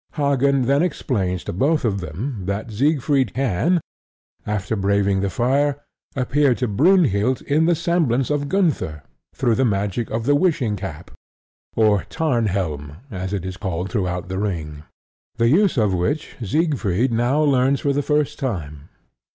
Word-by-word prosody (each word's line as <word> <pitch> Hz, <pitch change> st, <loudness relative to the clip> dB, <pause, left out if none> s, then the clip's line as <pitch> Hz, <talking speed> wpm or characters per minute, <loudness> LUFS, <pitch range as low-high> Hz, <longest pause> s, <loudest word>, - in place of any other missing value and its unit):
Hagen 140 Hz, -2 st, +2 dB
then 140 Hz, +4 st, +2 dB
explains 100 Hz, -, -1 dB
to -, -, -5 dB
both 145 Hz, -, +1 dB
of 100 Hz, -3 st, 0 dB
them 95 Hz, -, -5 dB
that 100 Hz, +3 st, -3 dB
Siegfried 140 Hz, +3 st, +1 dB
can, 135 Hz, -, +1 dB, 0.7 s
after 105 Hz, +1 st, -2 dB
braving 100 Hz, -1 st, +1 dB
the 100 Hz, 0 st, 0 dB
fire, 135 Hz, +8 st, +1 dB, 0.4 s
appear 135 Hz, 0 st, +2 dB
to 125 Hz, -, -1 dB
Brynhild 130 Hz, -, +3 dB
in 155 Hz, +3 st, +2 dB
the 175 Hz, -, +4 dB
semblance 160 Hz, -7 st, +1 dB
of 145 Hz, -1 st, -1 dB
Gunther 150 Hz, -, 0 dB, 0.3 s
through 120 Hz, -, +1 dB
the 130 Hz, -, +1 dB
magic 105 Hz, 0 st, -1 dB
of 115 Hz, +1 st, -2 dB
the 145 Hz, -, +3 dB
wishing 145 Hz, -, +1 dB
cap 90 Hz, -4 st, -7 dB, 0.6 s
(or 105 Hz, -3 st, +3 dB
Tarnhelm, 95 Hz, -, -1 dB
as 95 Hz, -1 st, -4 dB
it 95 Hz, -3 st, -3 dB
is 95 Hz, 0 st, -5 dB
called 95 Hz, -2 st, -3 dB
throughout 90 Hz, -4 st, -2 dB
The 95 Hz, +1 st, -3 dB
Ring), 80 Hz, -7 st, -4 dB, 0.5 s
the 115 Hz, 0 st, +2 dB
use 185 Hz, +3 st, +3 dB
of 105 Hz, -4 st, +2 dB
which 90 Hz, -, -2 dB
Siegfried 125 Hz, -, 0 dB
now 120 Hz, +5 st, +1 dB
learns 135 Hz, -1 st, +2 dB
for 140 Hz, -, +1 dB
the 145 Hz, -, +1 dB
first 150 Hz, 0 st, 0 dB
time. 80 Hz, -, -4 dB
120 Hz, 150 wpm, -21 LUFS, 95-145 Hz, 0.7 s, the